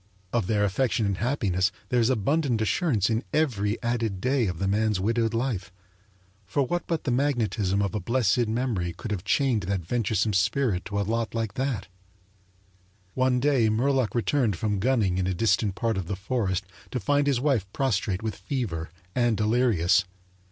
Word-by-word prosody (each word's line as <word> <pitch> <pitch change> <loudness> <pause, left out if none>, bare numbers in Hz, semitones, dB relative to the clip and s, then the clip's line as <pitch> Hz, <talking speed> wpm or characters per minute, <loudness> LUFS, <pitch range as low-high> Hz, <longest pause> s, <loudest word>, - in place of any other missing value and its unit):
Of 115 -6 +1
their 105 -2 +2
affection 110 +2 +1
and 100 -2 -1
happiness 100 -7 +1 0.2
there 125 - +2
is 115 +1 +3
abundant 130 +1 +1
assurance 110 - +1
in 115 +2 0
every 115 -9 +1
added 115 -5 -1
day 130 0 +1
of 90 -2 -3
the 95 +3 -1
man's 105 0 +1
widowed 115 +3 0
life; 115 -7 -2 0.8
for 140 +8 +1
what 175 +6 -2
but 165 -2 -1
the 130 - -1
magnetism 110 -7 +1
of 100 - -2
a 105 - -1
blessed 120 +2 +1
memory 110 -7 -1
could 105 +6 -7
have 95 -4 -2
chained 130 -6 +2
that 95 -4 -1
venturesome 110 0 0
spirit 95 +1 +1
to 100 0 -2
a - - +1
lot 115 +2 -2
like 110 -3 -2
that? 130 -7 -2 1.3
One 130 -1 +2
day 130 -4 +3
Murlock 125 +2 +1
returned 120 -3 +1
from 105 +2 -1
gunning 105 -5 +1
in 95 - 0
a 95 - -1
distant 105 -1 +1
part 115 +1 -1
of 95 -4 -3
the 100 - -2
forest 100 -2 -1 0.2
to 125 - -2
find 145 +6 +1
his 135 -4 +2
wife 125 -9 0
prostrate 105 -6 -1
with 110 -3 -2
fever, 95 - -3 0.2
and 120 -3 +2
delirious. 105 -5 +3
110 Hz, 175 wpm, -26 LUFS, 100-125 Hz, 1.3 s, is